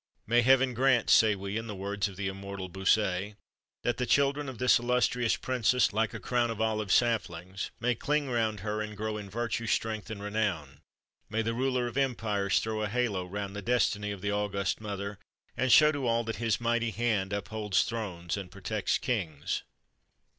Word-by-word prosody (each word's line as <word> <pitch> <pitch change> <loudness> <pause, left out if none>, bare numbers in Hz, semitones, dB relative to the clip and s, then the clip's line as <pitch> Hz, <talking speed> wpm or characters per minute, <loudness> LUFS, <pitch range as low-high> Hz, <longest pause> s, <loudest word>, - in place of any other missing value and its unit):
"May 120 +2 +4
Heaven 130 +1 +4
grant," 125 -1 +3
say 110 -2 +6
we, 100 +2 -4
in 115 0 -4
the 105 - -5
words 100 +1 -2
of 100 - -9
the 100 +1 -3
immortal 100 -1 -6
Bossuet, 95 +1 +1 0.5
"that 120 - 0
the 125 - -1
children 140 0 +2
of 130 - -8
this 125 +1 +4
illustrious 125 -1 +1
princess, 125 -2 +1
like 110 0 +1
a - - -4
crown 120 -1 0
of 115 - -4
olive 110 -3 0
saplings, 95 -6 0
may 125 +2 +1
cling 145 +4 0
round 110 -5 0
her, 105 +1 -2
and 105 -1 -6
grow 110 +1 -2
in 105 -2 -7
virtue, 115 +2 -2
strength, 110 -2 -1
and 105 -2 -6
renown; 105 -9 -2 0.5
may 115 +1 0
the 115 +1 -1
Ruler 125 0 0
of 120 +1 -5
empires 105 -8 +1
throw 110 -1 -2
a 105 - -1
halo 105 -6 -1
round 100 +1 -5
the 100 - -4
destiny 105 -3 +1
of 100 -2 -5
the 100 +1 -1
august 100 0 -1
mother, 100 -1 -5 0.4
and 130 -1 +1
show 150 +6 +8
to 140 -4 -2
all 115 0 +2
that 115 0 -4
His 115 -3 0
mighty 120 0 +1
hand 110 -4 0
upholds 105 0 0
thrones 95 -7 -4
and 95 -2 -6
protects 100 +2 -1
kings!" 85 - -2
110 Hz, 190 wpm, -29 LUFS, 100-120 Hz, 0.5 s, show